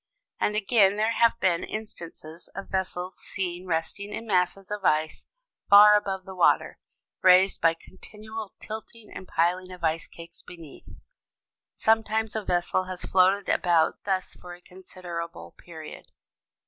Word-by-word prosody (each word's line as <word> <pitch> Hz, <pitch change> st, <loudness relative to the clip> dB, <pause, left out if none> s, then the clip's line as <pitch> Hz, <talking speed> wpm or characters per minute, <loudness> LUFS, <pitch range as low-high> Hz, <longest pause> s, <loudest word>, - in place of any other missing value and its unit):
And 210 Hz, -, 0 dB
again 205 Hz, -1 st, +3 dB
there 215 Hz, +2 st, +1 dB
have 230 Hz, 0 st, +2 dB
been 175 Hz, -4 st, +1 dB
instances 170 Hz, -6 st, -8 dB
of 195 Hz, -, -7 dB
vessels 185 Hz, -1 st, -3 dB
seen 180 Hz, -1 st, -5 dB
resting 175 Hz, +5 st, -3 dB
in 225 Hz, -, -6 dB
masses 190 Hz, -1 st, 0 dB
of 210 Hz, -1 st, -4 dB
ice 155 Hz, -2 st, 0 dB, 0.4 s
far 210 Hz, +1 st, +9 dB
above 195 Hz, -2 st, -2 dB
the 190 Hz, -, -9 dB
water, 180 Hz, -2 st, +2 dB, 0.4 s
raised 185 Hz, +1 st, +5 dB
by 165 Hz, 0 st, +4 dB
continual 215 Hz, +4 st, -10 dB
tilting 220 Hz, 0 st, -9 dB
and 185 Hz, -, -9 dB
piling 180 Hz, +3 st, 0 dB
of 180 Hz, -2 st, -11 dB
ice 160 Hz, 0 st, 0 dB
cakes 170 Hz, 0 st, -12 dB
beneath. 165 Hz, -5 st, -13 dB, 0.9 s
Sometimes 220 Hz, 0 st, +1 dB
a 220 Hz, -, -2 dB
vessel 180 Hz, 0 st, 0 dB
has 185 Hz, -1 st, -5 dB
floated 190 Hz, +2 st, +3 dB
about 170 Hz, -3 st, +2 dB
thus 190 Hz, -2 st, -2 dB
for 175 Hz, 0 st, -11 dB
a 175 Hz, -, -20 dB
considerable 180 Hz, -2 st, -8 dB
period. 160 Hz, -3 st, -11 dB
185 Hz, 140 wpm, -26 LUFS, 175-210 Hz, 0.9 s, far